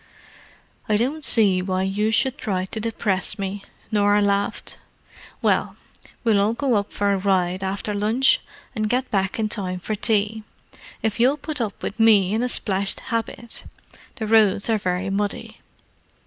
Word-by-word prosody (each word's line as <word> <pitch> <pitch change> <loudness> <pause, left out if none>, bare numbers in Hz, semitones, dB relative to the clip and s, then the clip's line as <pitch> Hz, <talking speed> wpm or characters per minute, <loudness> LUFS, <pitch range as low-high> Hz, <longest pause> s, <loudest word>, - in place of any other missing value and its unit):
"I 210 - +3
don't 275 +7 -1
see 200 -8 +4
why 185 0 -1
you 205 +3 0
should 255 +4 +1
try 185 -5 -1
to 220 - -5
depress 215 -3 -1
me," 195 0 -4 0.3
Norah 205 -1 +3
laughed. 200 0 -1 0.6
"Well, - - +1 0.5
we'll 220 -4 +3
all 215 +3 +1
go 245 -6 +1
for 200 0 0
a - - +1
ride 185 -1 +1
after 195 +2 -2
lunch, 220 +6 +3 0.3
and 215 -2 -1
get 255 +2 -1
back 195 -2 0
in 220 -1 0
time 190 -4 -3
for 200 +4 -4
tea, 215 0 0 0.6
if 220 0 -1
you'll 260 +5 +4
put 300 -2 -5
up 215 -3 -4
with 215 - -4
me 210 -4 +5
in 220 - +1
a 250 - 0
splashed 195 -4 -1
habit—the 230 -1 -6
roads 215 -1 +3
are 220 - +2
very 185 0 -2
muddy. 205 +1 -3
210 Hz, 155 wpm, -23 LUFS, 195-225 Hz, 0.6 s, me